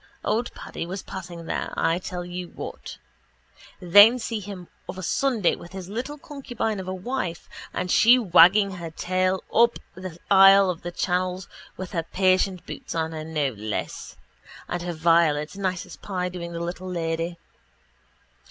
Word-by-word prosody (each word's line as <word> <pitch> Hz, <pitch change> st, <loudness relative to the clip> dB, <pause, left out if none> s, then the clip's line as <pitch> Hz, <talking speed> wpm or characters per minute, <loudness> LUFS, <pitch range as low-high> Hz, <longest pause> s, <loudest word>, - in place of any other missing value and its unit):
_ -, -, -32 dB, 0.2 s
Only 230 Hz, +3 st, 0 dB
Paddy -, -, -6 dB
was 190 Hz, +2 st, -5 dB
passing 175 Hz, -3 st, -8 dB
there, -, -, -3 dB
I 165 Hz, +2 st, +2 dB
tell 180 Hz, -1 st, -5 dB
you 180 Hz, 0 st, -6 dB
what. -, -, -8 dB, 0.8 s
Then 205 Hz, +7 st, +7 dB
see 225 Hz, -2 st, -3 dB
him 190 Hz, -3 st, -8 dB, 0.2 s
of -, -, -6 dB
a 185 Hz, -, -6 dB
Sunday 235 Hz, -1 st, +1 dB
with 170 Hz, -, -13 dB
his 190 Hz, -1 st, -7 dB
little 250 Hz, +8 st, -4 dB
concubine 245 Hz, -7 st, -4 dB
of 185 Hz, -, -6 dB
a -, -, -2 dB
wife, 185 Hz, -3 st, -4 dB, 0.2 s
and 180 Hz, -, -3 dB
she 240 Hz, +3 st, +7 dB
wagging 195 Hz, -1 st, +6 dB
her 170 Hz, -3 st, -6 dB
tail 185 Hz, +3 st, 0 dB
up 235 Hz, +1 st, +4 dB, 0.2 s
the 185 Hz, -3 st, -8 dB
aisle 195 Hz, 0 st, +8 dB
of 170 Hz, -, -8 dB
the 175 Hz, -, -5 dB
chapel 180 Hz, +1 st, -1 dB, 0.3 s
with 185 Hz, 0 st, -6 dB
her 170 Hz, -, -1 dB
patent 185 Hz, +1 st, +1 dB
boots -, -, -7 dB
on 160 Hz, -1 st, -1 dB
her, 155 Hz, -1 st, -5 dB
no 155 Hz, -3 st, -1 dB
less, 110 Hz, -3 st, -5 dB, 0.5 s
and 175 Hz, -, -3 dB
her 175 Hz, 0 st, -3 dB
violets, 160 Hz, -1 st, +2 dB
nice 185 Hz, -2 st, -2 dB
as -, -, -11 dB
pie, 180 Hz, -2 st, -3 dB
doing 175 Hz, -1 st, -6 dB
the 170 Hz, -, -5 dB
little 175 Hz, +2 st, -5 dB
lady. 165 Hz, 0 st, -2 dB
180 Hz, 170 wpm, -25 LUFS, 170-195 Hz, 0.8 s, aisle